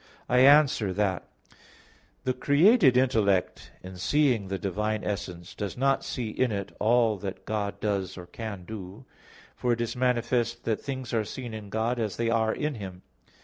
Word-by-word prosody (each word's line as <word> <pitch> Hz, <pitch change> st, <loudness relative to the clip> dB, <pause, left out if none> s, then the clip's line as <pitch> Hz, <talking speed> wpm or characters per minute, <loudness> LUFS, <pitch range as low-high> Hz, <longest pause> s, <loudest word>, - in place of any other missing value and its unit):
I 125 Hz, -, +3 dB
answer 135 Hz, -7 st, +5 dB
that, 95 Hz, -2 st, -1 dB, 1.0 s
The 130 Hz, -, 0 dB
created 145 Hz, -, +5 dB
intellect, 110 Hz, -8 st, +1 dB
in 90 Hz, 0 st, -9 dB
seeing 125 Hz, 0 st, +2 dB
the 95 Hz, 0 st, -2 dB
divine 105 Hz, +2 st, -2 dB
essence, 95 Hz, -4 st, -5 dB
does 100 Hz, +2 st, -5 dB
not 135 Hz, +1 st, +2 dB
see 120 Hz, -4 st, -4 dB
in 125 Hz, +2 st, 0 dB
it 100 Hz, -2 st, -4 dB
all 115 Hz, -1 st, +3 dB
that 95 Hz, 0 st, -7 dB
God 105 Hz, -2 st, -3 dB
does 100 Hz, -4 st, -2 dB
or 90 Hz, -, -8 dB
can 100 Hz, -2 st, -7 dB
do. 105 Hz, +3 st, -9 dB, 0.5 s
For 120 Hz, -1 st, 0 dB
it 115 Hz, -, -2 dB
is 115 Hz, 0 st, -2 dB
manifest 120 Hz, -1 st, 0 dB
that 110 Hz, -2 st, -1 dB
things 130 Hz, -3 st, -5 dB
are 110 Hz, -2 st, +2 dB
seen 120 Hz, +2 st, -7 dB
in 105 Hz, -2 st, -7 dB
God 115 Hz, +4 st, -1 dB
as 110 Hz, -4 st, -2 dB
they 115 Hz, 0 st, 0 dB
are 110 Hz, -1 st, +2 dB
in 150 Hz, +4 st, -2 dB
Him. 95 Hz, -6 st, -8 dB
110 Hz, 170 wpm, -27 LUFS, 100-125 Hz, 1.0 s, answer